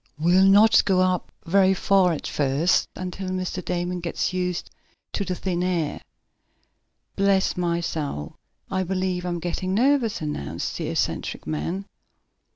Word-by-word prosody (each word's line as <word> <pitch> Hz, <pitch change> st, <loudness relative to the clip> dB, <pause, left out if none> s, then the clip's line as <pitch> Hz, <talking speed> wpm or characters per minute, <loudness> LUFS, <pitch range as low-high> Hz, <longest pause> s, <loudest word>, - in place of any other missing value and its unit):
"We'll 175 Hz, +5 st, +4 dB
not 210 Hz, +3 st, +6 dB
go 190 Hz, -2 st, +2 dB
up 185 Hz, -1 st, 0 dB
very 190 Hz, +2 st, +4 dB
far 190 Hz, -1 st, +3 dB
at 160 Hz, -, -4 dB
first, 145 Hz, +5 st, +1 dB
until 185 Hz, +1 st, -5 dB
Mr. 185 Hz, 0 st, -3 dB
Damon 175 Hz, +1 st, -2 dB
gets 170 Hz, +1 st, -2 dB
used 180 Hz, -1 st, -2 dB, 0.4 s
to 200 Hz, -, -1 dB
the 185 Hz, -2 st, -3 dB
thin 180 Hz, -1 st, -2 dB
air." 175 Hz, -4 st, -1 dB, 1.1 s
"Bless 195 Hz, -1 st, +2 dB
my 170 Hz, -1 st, 0 dB
soul, 145 Hz, -, -4 dB, 0.4 s
I 190 Hz, -1 st, 0 dB
believe 185 Hz, -1 st, -1 dB
I'm 175 Hz, -1 st, -1 dB
getting 185 Hz, +2 st, -2 dB
nervous," 250 Hz, -1 st, +2 dB
announced 85 Hz, -, -4 dB
the -, -, -2 dB
eccentric -, -, -2 dB
man. 125 Hz, -, -3 dB
180 Hz, 140 wpm, -24 LUFS, 170-190 Hz, 1.1 s, not